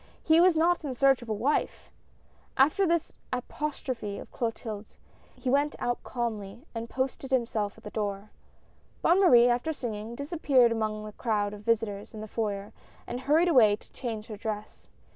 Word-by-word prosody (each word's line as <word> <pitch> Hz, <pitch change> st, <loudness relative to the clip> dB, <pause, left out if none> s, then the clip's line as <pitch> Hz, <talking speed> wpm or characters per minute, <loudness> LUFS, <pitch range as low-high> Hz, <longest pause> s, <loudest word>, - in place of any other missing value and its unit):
He 320 Hz, +1 st, +5 dB
was 355 Hz, -2 st, +5 dB
not 340 Hz, +1 st, +3 dB
in 270 Hz, -4 st, -3 dB
search 270 Hz, 0 st, +4 dB
of 240 Hz, -, -10 dB
a -, -, +1 dB
wife! 265 Hz, +8 st, -1 dB, 0.7 s
After 310 Hz, +9 st, +4 dB
this 335 Hz, -1 st, 0 dB, 0.2 s
apostrophe 255 Hz, -5 st, -3 dB
of -, -, -10 dB
Clotilde's 220 Hz, -3 st, -5 dB, 0.4 s
he -, -, -8 dB
went 285 Hz, +3 st, +2 dB
out 245 Hz, 0 st, -2 dB
calmly 230 Hz, 0 st, -4 dB
and 230 Hz, 0 st, -5 dB
posted 265 Hz, 0 st, -3 dB
himself 230 Hz, -6 st, 0 dB
at -, -, -17 dB
the 210 Hz, -, -8 dB
door. 205 Hz, -1 st, -3 dB, 0.7 s
Bonne 350 Hz, +3 st, +5 dB
Marie, 245 Hz, -10 st, +7 dB
after 245 Hz, +6 st, +1 dB
singing, 230 Hz, -5 st, -5 dB
disappeared 280 Hz, -4 st, +3 dB
among 215 Hz, -1 st, -2 dB
the 215 Hz, -, -7 dB
crowd 210 Hz, -2 st, -1 dB
of 205 Hz, -, -9 dB
visitors 215 Hz, -1 st, -1 dB
in 215 Hz, -, -6 dB
the 215 Hz, -, -6 dB
foyer 205 Hz, -2 st, -3 dB, 0.3 s
and 245 Hz, -, -4 dB
hurried 300 Hz, +7 st, +3 dB
away 235 Hz, -11 st, +6 dB
to -, -, -21 dB
change 225 Hz, -4 st, -5 dB
her 215 Hz, -2 st, -8 dB
dress. 210 Hz, 0 st, -6 dB
235 Hz, 170 wpm, -28 LUFS, 215-275 Hz, 0.7 s, Marie